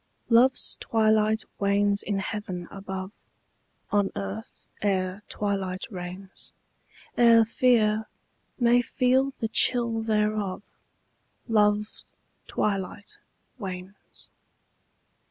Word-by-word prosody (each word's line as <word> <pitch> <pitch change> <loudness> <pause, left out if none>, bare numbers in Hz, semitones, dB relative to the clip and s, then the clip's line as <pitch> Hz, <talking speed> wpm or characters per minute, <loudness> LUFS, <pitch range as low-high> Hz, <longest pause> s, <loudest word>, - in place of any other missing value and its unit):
LOVE'S 250 +2 +3
twilight 220 0 +2 0.2
wanes 200 0 +2
in 200 -1 -2
heaven 195 -3 -4
above, 190 -1 -6 0.8
On 205 -1 +2
earth 100 +2 -6 0.2
ere 190 -1 0
twilight 195 -3 -2
reigns: 185 +1 -8 0.6
Ere 230 -1 +6
fear 220 -3 +2 0.5
may 240 0 +5
feel 260 +2 +2
the 225 - -1
chill 230 0 +2
thereof, 210 -3 0 0.8
Love's 210 -1 +1 0.3
twilight 200 0 -3 0.4
wanes. 190 -1 -9
210 Hz, 80 wpm, -26 LUFS, 195-225 Hz, 0.8 s, Ere